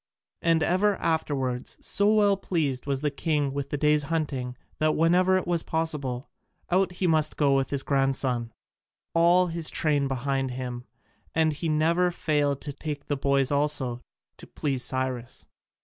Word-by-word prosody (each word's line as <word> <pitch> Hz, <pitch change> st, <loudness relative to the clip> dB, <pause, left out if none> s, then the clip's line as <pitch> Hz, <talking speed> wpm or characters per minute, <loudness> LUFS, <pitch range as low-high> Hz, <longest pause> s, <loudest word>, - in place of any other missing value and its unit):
And 165 Hz, -2 st, +2 dB
ever 195 Hz, +5 st, +2 dB
afterwards, 135 Hz, -7 st, -2 dB
so 205 Hz, +1 st, +1 dB
well 205 Hz, -2 st, +4 dB
pleased 150 Hz, -9 st, -2 dB
was 135 Hz, -1 st, -1 dB
the 150 Hz, -1 st, 0 dB
king 145 Hz, -2 st, -1 dB
with 140 Hz, -1 st, -4 dB
the 145 Hz, -, -2 dB
day's 150 Hz, +1 st, +3 dB
hunting, 140 Hz, -6 st, -3 dB, 0.2 s
that 155 Hz, 0 st, +2 dB
whenever 180 Hz, +3 st, +3 dB
it 185 Hz, -, -2 dB
was 175 Hz, -2 st, +1 dB
possible, 150 Hz, -6 st, -2 dB, 0.4 s
out 185 Hz, 0 st, +2 dB
he 180 Hz, -, -2 dB
must 155 Hz, -3 st, +2 dB
go 140 Hz, -2 st, +3 dB
with 135 Hz, -1 st, 0 dB
his 140 Hz, -1 st, -1 dB
grandson, 135 Hz, -4 st, 0 dB, 0.6 s
all 175 Hz, +2 st, +5 dB
his 165 Hz, -2 st, 0 dB
train 145 Hz, -3 st, +1 dB
behind 135 Hz, 0 st, -1 dB
him, 125 Hz, -1 st, -5 dB, 0.5 s
and 160 Hz, -1 st, +3 dB
he 160 Hz, +3 st, -3 dB
never 165 Hz, +4 st, +2 dB
failed 145 Hz, -5 st, 0 dB
to 145 Hz, -, -5 dB
take 145 Hz, 0 st, -6 dB
the 145 Hz, -, -1 dB
boys 140 Hz, -1 st, +1 dB
also, 140 Hz, -4 st, +1 dB, 0.4 s
"to -, -, -12 dB
please 135 Hz, -4 st, -2 dB
Cyrus." 130 Hz, -2 st, -3 dB
150 Hz, 160 wpm, -26 LUFS, 135-165 Hz, 0.6 s, all